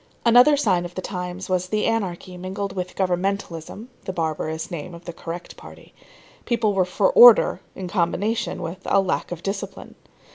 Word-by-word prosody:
Another 245 +5 +6
sign 190 -10 +2
of 175 0 -8
the 185 - -3
times 180 -1 -5
was 185 -1 0
the 210 +2 0
anarchy 190 -5 -2
mingled 190 +2 -5
with 180 -1 -4
governmentalism 190 +1 -2 0.2
[the - - -3
barbarous 160 -1 -3
name 170 +1 -6
of 170 - -14
the 175 - -6
correct 170 +1 -8
party]. - - -14 0.5
People 225 -3 +1
were 190 -2 +2
for 190 +2 +1
order 240 -3 +7
in 185 - -6
combination 195 +5 -1
with 165 +3 -6
lack 195 -2 +1
of 175 -1 -6
discipline. 195 0 -5
185 Hz, 160 wpm, -23 LUFS, 175-200 Hz, 0.5 s, order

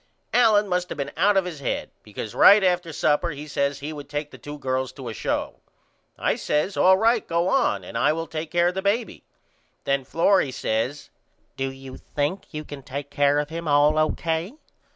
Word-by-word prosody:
Allen 215 -4 +4
must 180 -1 -1
have - - -6
been 140 0 -3
out 195 +4 +3
of 190 - +2
his 170 -5 -6
head 140 - -3
because 105 +1 -7
right 205 0 +7
after 180 -2 +1
supper 150 +2 +1
he 150 -1 -7
says 140 -1 -1
he 150 +2 -5
would 145 -1 -9
take 145 0 -4
the - - -12
2 145 0 -8
girls 130 -1 -2
to 130 -2 -8
a - - -5
show. - - -3 0.6
I - - 0
says 150 +7 -1
All 190 0 +5
right 225 +2 +2
go 170 +1 +1
on 265 +3 +1
and - - -10
I - - +3
will 165 +1 -2
take 160 -1 -5
care 175 0 +3
of - - -5
the 190 - -3
baby. 210 +4 -1 0.6
Then 140 -1 0
Florrie 165 +2 +2
says 130 +5 -2 0.4
Do 135 0 -2
you 135 -1 -10
think 150 +7 -3
you 155 -1 -5
can 145 -2 -9
take 140 +2 -7
care 145 0 +3
of 150 0 -1
him 165 0 -5
all 145 +1 +4
O.K.? 165 - -1
155 Hz, 205 wpm, -24 LUFS, 140-180 Hz, 0.6 s, right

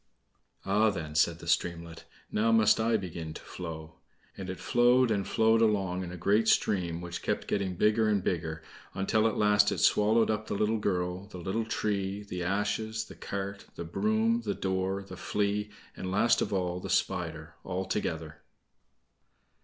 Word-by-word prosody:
"Ah, 105 +3 +3
then," 80 -6 -5
said 80 +2 +3
the 85 - -11
streamlet, 85 -1 -1 0.3
"now 115 +2 +2
must 110 -1 +5
I 110 0 +2
begin 85 -5 -6
to - - -8
flow." 80 -3 -8 0.4
And 95 -1 -7
it 95 - -5
flowed 120 0 +4
and 100 -3 0
flowed 110 0 +3
along, 95 -4 +1
in 90 - -6
a 90 - -7
great 105 +6 +2
stream, 85 -6 +1
which 90 0 -6
kept - - -1
getting 95 -3 -1
bigger 110 +4 +3
and 100 -3 +1
bigger, 80 -3 -2 0.3
until 110 +3 +2
at 110 - -2
last 105 0 +4
it - - -2
swallowed 110 +2 +3
up 110 0 -3
the - - -2
little 110 +2 +1
girl, 90 -1 -2
the 100 - -10
little 95 +6 -2
tree, 100 -2 -2
the 90 -3 -5
ashes, 105 +4 -1
the - - -12
cart, 100 0 -5
the - - -5
broom, 110 +6 +1
the 105 -3 -2
door, 95 +1 -1
the 95 - -10
Flea, 105 0 -1 0.3
and, 95 - -5
last 105 +5 +3
of - - -1
all, 90 -2 -1
the - - -7
Spider, 85 -3 -1
all 95 0 -3
together. 95 - -3
100 Hz, 175 wpm, -29 LUFS, 90-110 Hz, 0.4 s, must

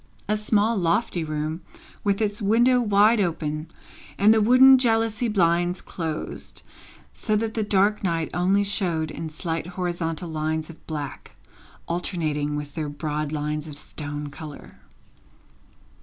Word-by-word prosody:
A 210 - +2
small 215 +1 +1
lofty 175 0 +1
room, 155 +2 -3 0.4
with 200 +1 +1
its 205 +1 -1
window 240 +5 +4
wide 210 +1 +4
open, 155 -4 -2 0.5
and 210 +2 +6
the 220 - +3
wooden 255 +4 +7
jalousie 225 -1 +1
blinds 175 -3 +2
closed, 160 -3 -6 0.5
so 215 - -1
that 220 +1 -1
the 225 - -1
dark 205 +1 +2
night 165 -3 -1
only 190 +3 +2
showed 175 -6 0
in 160 0 -5
slight 165 +1 -4
horizontal 175 -2 -2
lines 155 +1 -2
of 165 - -19
black, 150 -4 -6 0.5
alternating 155 -4 -2
with 145 -1 -5
their 155 -1 -3
broad 150 0 -3
lines 150 0 -3
of 145 -2 -8
stone 145 0 -5
colour. 145 - -10
175 Hz, 135 wpm, -24 LUFS, 155-210 Hz, 0.5 s, wooden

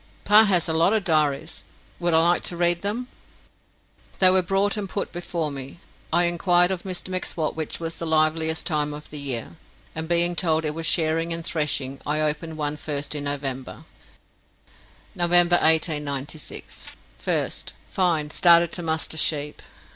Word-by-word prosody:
"Pa 210 +2 +7
has 180 -5 +2
lots 165 +6 +2
of 210 - -3
diaries. 155 -2 0 0.4
Would 175 -2 +1
I 160 - +4
like 175 - +2
to 175 - -2
read 175 0 +2
them?" 220 +5 -2 1.1
They 185 -1 +5
were 185 0 +4
brought 195 +3 0
and 205 -3 -5
put 200 - -3
before 170 -3 -3
me. 135 +3 -8 0.3
I 175 +2 +3
inquired 175 +1 +3
of 185 -2 -3
Mr 185 0 -5
M'Swat 180 -4 -2
which 160 -1 -4
was 165 0 -5
the 165 - -4
liveliest 160 0 +1
time 150 -2 -1
of 150 - -11
the 150 - -5
year, 120 -11 -4 0.4
and 160 0 -5
being 175 0 +2
told 160 -2 +1
it 150 - -1
was 165 0 -2
shearing 165 0 +1
and 165 0 -2
threshing, 145 -5 -2
I 150 +1 -1
opened 155 +1 -2
one 150 -1 -2
first 145 -1 -4
in 145 -1 -4
November: 135 -2 -4 1.3
"November 175 0 +4
1896 150 -3 -1 0.4
1st. - - -1
Fine. 165 -5 0
Started 170 -1 +5
to 175 - -2
muster 160 -1 -1
sheap. 150 -2 -1
160 Hz, 160 wpm, -23 LUFS, 150-175 Hz, 1.3 s, Pa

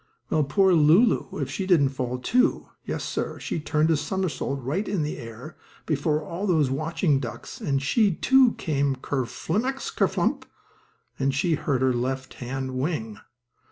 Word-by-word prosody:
Well, 155 - +3
poor 185 +7 +3
Lulu, 170 +8 +4
if - - -3
she 190 - -3
didn't 155 -8 +4
fall, 125 -2 -3
too! 250 - +1
Yes, - - -4
sir, - - -3
she - - -3
turned 155 +1 +1
a - - +4
somersault 150 -3 -2
right 165 - -2
in 190 -6 0
the 150 - -4
air, 115 +7 -9 0.3
before 150 0 0
all 185 +7 -4
those 155 -7 +2
watching 155 +1 +1
ducks, 120 -4 -7
and 140 -2 0
she, 205 - +3
too, 265 +2 +4
came 140 -4 0
down 130 - -13
ker 135 -3 -1
flimmax 245 - -3
ker - - +3
flump, - - -1 0.7
and 135 0 +1
she 165 +4 +1
hurt 135 -4 0
her 130 -1 +3
left 130 +2 -3
hand 130 +1 -4
wing. 115 -8 -3
150 Hz, 170 wpm, -25 LUFS, 135-180 Hz, 0.7 s, Lulu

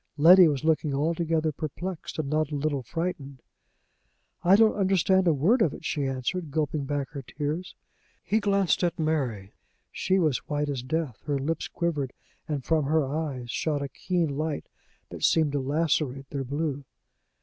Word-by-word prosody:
Letty 175 +4 +8
was 145 -2 -1
looking 155 -3 +1
altogether 160 +1 0
perplexed, 160 +4 -6
and 155 -3 -2
not 155 +1 0
a 150 - -4
little 145 -1 -1
frightened. 140 -2 -4 1.0
"I 185 +3 +6
don't 220 +1 +5
understand 190 -1 +2
a - - +6
word 200 - +3
of 160 - +2
it," - - -12
she 145 -3 -1
answered, 140 +6 -3
gulping 150 -1 -1
back 145 0 -3
her 140 -2 -6
tears. 150 +7 -4 0.5
He 215 - +1
glanced 200 -4 +1
at 175 0 0
Mary. 135 - -1 0.4
She 190 +1 +1
was 155 -9 +2
white 145 0 -1
as 135 -3 -2
death, 140 -2 -3
her 145 -2 0
lips 150 +4 -2
quivered, 150 -7 -2 0.3
and 145 -5 -3
from 160 -3 +2
her 155 +1 +2
eyes 135 -4 -3
shot 145 +1 -1
a - - -2
keen 170 -5 -1
light 155 0 -2 0.5
that - - -8
seemed 160 -3 +3
to 145 - 0
lacerate 140 -1 -1
their 140 -2 -2
blue. 145 +1 -2
155 Hz, 170 wpm, -27 LUFS, 140-165 Hz, 1.0 s, Letty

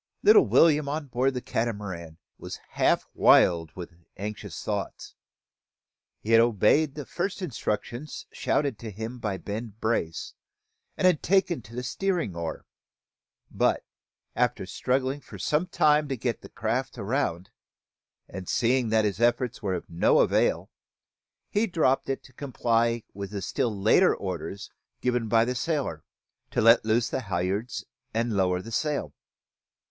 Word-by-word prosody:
Little 420 -1 +7
William, 150 -3 +4
on 145 -1 -3
board 130 +2 +1
the 125 - -3
Catamaran, 100 -8 -3 0.2
was - - -7
half - - +2
wild 85 -2 +5
with 90 -1 -8 0.2
anxious 105 +2 -6
thoughts. - - -4 1.1
He 110 - -3
had 115 0 +7
obeyed 120 +6 +3
the 145 -2 -6
first 180 +2 -3
instructions 125 - -4
shouted 140 -7 0
to 115 - -6
him 110 +4 -6
by 105 -4 -2
Ben 105 +4 -6
Brace, 110 -8 -2 0.6
and 180 -5 +3
taken 185 -5 +2
to 115 +2 -13
the 125 - -3
steering 175 - -1
oar; 85 -2 -5 0.9
but, - - +1 0.5
after - - 0
struggling 130 +2 -1
for - - -11
some 155 +4 0
time 150 -3 +3
to 135 -2 -3
get 120 -1 -2
the - - -12
craft 125 +5 -2
round, 100 -5 -2 0.8
and 90 0 -8
seeing 125 0 +2
that 110 -1 +3
his 100 +1 -2
efforts 120 0 +1
were 95 -3 -1
of 90 - -6
no 85 +1 +3
avail, - - +1 0.8
he 210 +2 +1
dropped 155 -9 +1
it 135 - -2
to 130 - -17
comply 115 -3 0
with 100 0 -6
the 100 -2 -5
still 105 +1 -1
later 110 - +5
orders 95 0 -5 0.3
given 125 -2 0
by 115 +1 +4
the 125 - -1
sailor: 145 +3 -2 0.5
to - - -1
let 115 +2 +6
loose 110 +1 +2
the 130 - -2
halliards 95 +3 -2 0.3
and 115 0 0
lower 90 -1 +1
the 115 - -9
sail. 150 +5 -1
115 Hz, 145 wpm, -27 LUFS, 100-140 Hz, 1.1 s, Little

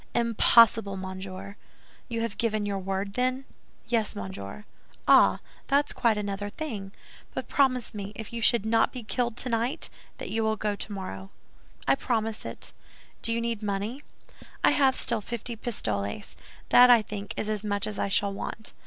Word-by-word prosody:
"Impossible, 230 -3 +5
monsieur." 190 +1 -7 0.5
"You 230 -1 -2
have 230 -3 -3
given 215 -2 +1
your 200 -1 -1
word, 195 +1 -3
then?" 255 +2 0 0.4
"Yes, 225 -3 0
monsieur." 100 - -7 0.4
"Ah, - - +6 0.3
that's 285 +1 +2
quite 230 -3 +2
another 205 0 -3
thing; 210 -8 -5 0.4
but - - -3
promise 255 -4 +2
me, 205 -1 -5
if 220 +1 -8
you 235 - -3
should 225 -1 +4
not 225 0 +3
be 250 -3 -7
killed 235 +2 -1
tonight, 235 +1 0 0.3
that - - -6
you 225 0 0
will 220 0 +2
go 210 -1 -1
tomorrow." 185 - -6 0.6
"I 135 - +6
promise 225 - -1
it." - - -6 0.5
"Do 230 - +1
you 230 - +1
need 230 -2 -2
money?" 210 +6 -2 0.6
"I - - +6
have 270 -2 +4
still 230 -2 0
fifty 235 +2 -4
pistoles. 105 - -3 0.3
That, 250 0 +8
I 235 -3 +7
think, 205 -1 -6
is - - -1
as 215 -1 -2
much 205 -1 -1
as 210 -2 -4
I - - +1
shall 200 0 +2
want." 215 +2 -5
215 Hz, 165 wpm, -27 LUFS, 200-235 Hz, 0.6 s, That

